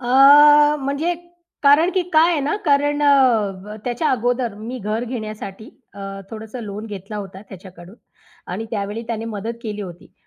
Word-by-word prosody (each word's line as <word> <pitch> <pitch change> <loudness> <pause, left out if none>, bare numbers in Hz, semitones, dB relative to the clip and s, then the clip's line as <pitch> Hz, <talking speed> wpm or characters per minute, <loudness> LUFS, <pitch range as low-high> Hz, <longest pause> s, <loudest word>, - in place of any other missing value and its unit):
अ, 240 - -7 0.7
म्हणजे 280 +6 -1 0.5
कारण 295 +5 +5
की 370 - +2
काय 320 +2 +5
आहे 310 - 0
ना 295 +8 -1
कारण 290 0 +2
अ, 215 -8 +2
त्याच्या 245 +6 -1
अगोदर 245 -2 -1
मी 230 +5 -7
घर 215 +3 -3
घेण्यासाठी 215 -1 -7 0.2
अ, 200 - -12 0.3
थोडंसं 220 +2 -8
लोन 210 +1 -7
घेतला 205 0 -8
होता 195 -1 -8
त्याच्याकडून 185 -1 -13 0.6
आणि 220 +5 -4
त्यावेळी 210 +1 -4
त्याने 225 -1 -4
मदत 225 +1 -5
केली 210 -2 -5
होती 175 -2 -11
225 Hz, 150 wpm, -20 LUFS, 205-270 Hz, 0.7 s, कारण